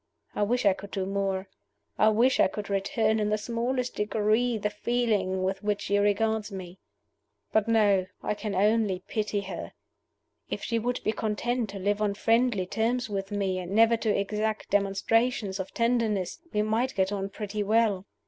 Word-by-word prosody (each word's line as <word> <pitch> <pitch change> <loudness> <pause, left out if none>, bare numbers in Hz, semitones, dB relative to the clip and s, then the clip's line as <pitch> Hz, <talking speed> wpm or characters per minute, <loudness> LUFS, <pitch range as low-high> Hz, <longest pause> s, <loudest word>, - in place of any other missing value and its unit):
I - - -3
wish 240 +4 +1
I 200 - +6
could 200 +1 -10
do 190 -1 -2
more; 195 0 -1 0.5
I 215 - +6
wish 235 +5 +3
I - - +6
could 205 +1 -6
return 215 +3 +1
in 210 0 0
the 215 - +1
smallest 240 +3 -2
degree 220 +3 +1
the 210 0 -2
feeling 210 -5 0
with 190 +1 -1
which 205 -1 -1
she 205 +1 +1
regards 210 +1 +1
me. 185 -1 -8 0.7
But 220 0 +2
no 205 -5 +3 0.2
I - - 0
can 210 -1 -4
only 205 -2 +2
pity 210 -2 -1
her. 190 -3 -7 0.8
If - - -4
she 230 - 0
would 245 +2 -2
be - - +1
content 225 +2 -1
to 200 - -6
live 205 +2 0
on 205 -1 +1
friendly 225 -3 +2
terms 225 +3 -1
with 195 -1 -3
me, 195 -3 -1
and 180 +1 -5
never 225 +2 +5
to 220 -3 0
exact 215 +2 -2
demonstrations 205 +1 +1
of 190 - -4
tenderness, 230 -6 0
we 210 - +1
might 230 +5 0
get 190 0 +1
on 195 -1 -2
pretty 210 +1 -4
well. 210 -2 +2
210 Hz, 175 wpm, -27 LUFS, 195-225 Hz, 0.8 s, I